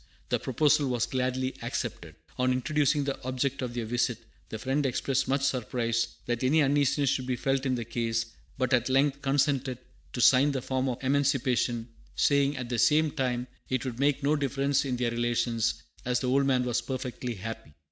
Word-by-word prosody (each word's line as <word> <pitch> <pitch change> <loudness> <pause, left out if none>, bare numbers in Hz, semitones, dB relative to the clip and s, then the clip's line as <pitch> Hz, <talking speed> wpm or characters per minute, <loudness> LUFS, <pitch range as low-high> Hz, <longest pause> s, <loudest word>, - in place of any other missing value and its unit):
The - - +1
proposal 145 +2 +2
was 120 -2 +1
gladly 130 +1 -1
accepted. 80 -2 -4 0.2
On 130 0 +3
introducing 145 +3 +1
the 140 -1 -3
object 130 +2 -1
of 125 -2 -4
their 120 -2 -2
visit, 120 +2 0 0.3
the 110 - -4
Friend 135 +6 -1
expressed 135 0 0
much 135 +1 +1
surprise 115 -3 0 0.2
that 120 +1 -2
any 150 +4 +4
uneasiness 140 0 +2
should 130 -2 -2
be 130 - 0
felt 135 +2 0
in 130 - +1
the 120 -2 -4
case, 115 0 -1 0.3
but 130 0 0
at 120 0 +2
length 140 +1 +2
consented 135 -2 +1 0.4
to - - -4
sign 135 +4 +5
the 130 - -2
form 130 0 -1
of 125 +1 -5
emancipation, 130 -4 +1 0.3
saying, 140 0 +2
at 125 -1 -4
the 120 -2 -1
same 155 +3 +4
time, 125 -4 -1 0.2
it 130 0 -1
would 125 -2 -5
make 140 0 +1
no 145 +2 +3
difference 140 0 0
in 125 -2 -1
their 120 -1 0
relations, 120 -1 0 0.2
as 125 0 0
the 130 - -2
old 135 +1 +3
man 130 -2 +2
was 120 -1 0
perfectly 125 -1 -4
happy. 115 -3 -7
130 Hz, 190 wpm, -28 LUFS, 120-140 Hz, 0.4 s, sign